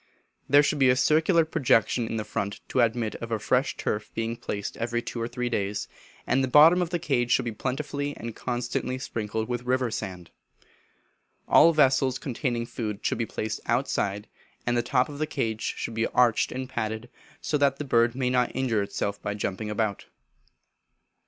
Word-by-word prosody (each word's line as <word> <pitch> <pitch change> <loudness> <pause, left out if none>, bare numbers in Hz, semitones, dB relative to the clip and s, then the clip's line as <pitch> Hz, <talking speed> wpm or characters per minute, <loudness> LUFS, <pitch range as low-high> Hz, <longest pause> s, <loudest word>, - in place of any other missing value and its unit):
There 145 +2 +7
should 145 0 0
be 135 -2 +5
a 125 - +5
circular 160 +5 +3
projection 120 -5 +2
in 110 -1 -2
front 100 -1 -3
to - - 0
admit 115 -1 +1
of 115 0 -7
a 115 - +1
fresh 125 +5 0
turf 105 0 -2
being 115 +1 -2
placed 100 -3 -5
every 120 +1 -1
two 120 - -5
or 115 - -1
three 125 0 -3
days, 100 -3 -2 0.4
and 135 +1 +2
the - - +1
bottom 160 +7 +7
of 175 - -1
the 175 - 0
cage 120 -8 0
should - - +3
be 120 - -2
plentifully 145 +5 -3
and 115 -1 -6
constantly 125 +1 -2
sprinkled 110 -3 -3
with 125 -1 -2
river 125 -1 0
sand. 90 -6 -6 1.2
All 165 - +7
vessels 135 -4 +3
containing 120 -2 -2
food 110 -3 -5
should - - 0
be 115 - -1
placed 110 0 -4
outside, 105 -5 0 0.4
and 120 - +1
the 120 - +3
top 125 +1 +1
of 145 -1 -9
the 155 - 0
cage 110 -4 -2 0.2
should 115 - -4
be 115 0 0
arched 120 -3 +2
and 130 0 -4
padded, 110 -2 -3 0.3
so - - -2
that 140 -1 +3
the 150 - -4
bird 115 -2 +3
may 130 -1 0
not 125 -1 +1
injure 120 -5 +1
itself 100 0 -3
by 105 - -3
jumping 105 +1 -3
about. 105 -1 -2
120 Hz, 185 wpm, -26 LUFS, 110-130 Hz, 1.2 s, There